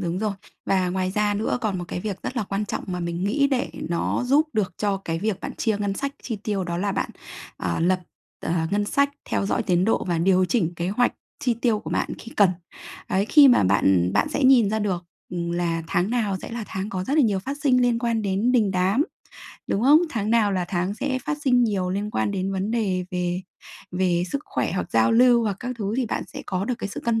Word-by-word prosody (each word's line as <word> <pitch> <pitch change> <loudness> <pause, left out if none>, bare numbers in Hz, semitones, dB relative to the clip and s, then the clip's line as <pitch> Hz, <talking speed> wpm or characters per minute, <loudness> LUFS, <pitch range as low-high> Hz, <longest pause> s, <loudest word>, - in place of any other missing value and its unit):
đúng 175 -1 -2
rồi. 215 0 -1 0.3
Và 185 -2 +2
ngoài 185 0 -1
ra 210 +1 +1
nữa 220 +4 -1
còn 210 -5 -1
một 175 - -4
cái - - -4
việc 200 -1 -5
rất 255 - -5
là 235 - +1
quan 195 +2 -2
trọng - - -4
mà 180 -1 -3
mình 170 +1 -3
nghĩ 280 +8 +2
để 250 - -1 0.2
nó 170 +7 0
giúp 295 +5 +3
được 195 -4 0
cho 200 -2 +1
cái 165 -4 -4
việc 210 +1 -2
bạn - - -5
chia 220 -2 0
ngân 200 -1 -1
sách 280 +6 -3
chi 225 -4 -4
tiêu 200 -2 -2
đó 170 -1 -3
là 200 +3 -1
bạn, - - -2 0.5
ờ, - - -2
lập 180 +2 +2 0.4
ờ, - - -2 0.2
ngân 205 +1 +1
sách 280 +6 +2
theo 195 - -1
dõi - - 0
tiến 180 -1 +2
độ 225 - +1
và 175 -2 0
điều 185 +2 +3
chỉnh 180 -4 0
kế 170 +1 -2
hoạch 245 +5 +2 0.3
chi 245 -3 +1
tiêu 230 -2 +1
của - - -7
bạn - - 0
khi 230 - -10
cần. 200 -3 +6 0.6
Đấy, 195 +2 +1
khi 285 +2 +7
mà 245 - +5
bạn 95 -2 +3
bạn - - +2
sẽ 290 -2 -1
nhìn 245 -6 +6
ra 220 - 0
được 190 -4 -2 0.3
là 170 -1 -1
tháng 180 +6 0
nào 215 -6 0
sẽ - - -7
là 230 -1 -4
tháng 190 +3 -4
có 185 -3 -3
rất 275 - -1
là 305 - +6
nhiều 205 -4 +2
phát 270 +9 -5
sinh 255 -3 +4
liên 240 -1 +2
quan 230 -2 0
đến 200 +5 +1
đình 220 -6 +3
đám, 190 +7 +2 0.6
đúng 205 - 0
không? 290 +4 +7
Tháng 215 -2 -2
nào 225 -3 +3
là 185 -2 0
tháng 180 +2 -1
sẽ 260 +3 -1
phát 300 0 -2
sinh 250 -3 +4
nhiều 195 -5 0
liên 205 +3 -2
quan - - 0
đến 195 -1 -2
vấn 195 +3 -2
đề 195 -6 0
về 180 0 -1 0.5
về 180 -1 +1
sức 280 - +1
khỏe - - -2
hoặc - - -3
giao - - +3
lưu 240 0 +5
hoặc 205 -4 -1
các 250 0 -4
thứ, 205 0 -2
thì 260 - 0
bạn - - -2
sẽ - - -9
có 185 +1 -1
được 250 +3 -1
cái 200 - -4
sự - - -6
cân 225 -1 0
205 Hz, 245 wpm, -24 LUFS, 185-235 Hz, 0.6 s, khi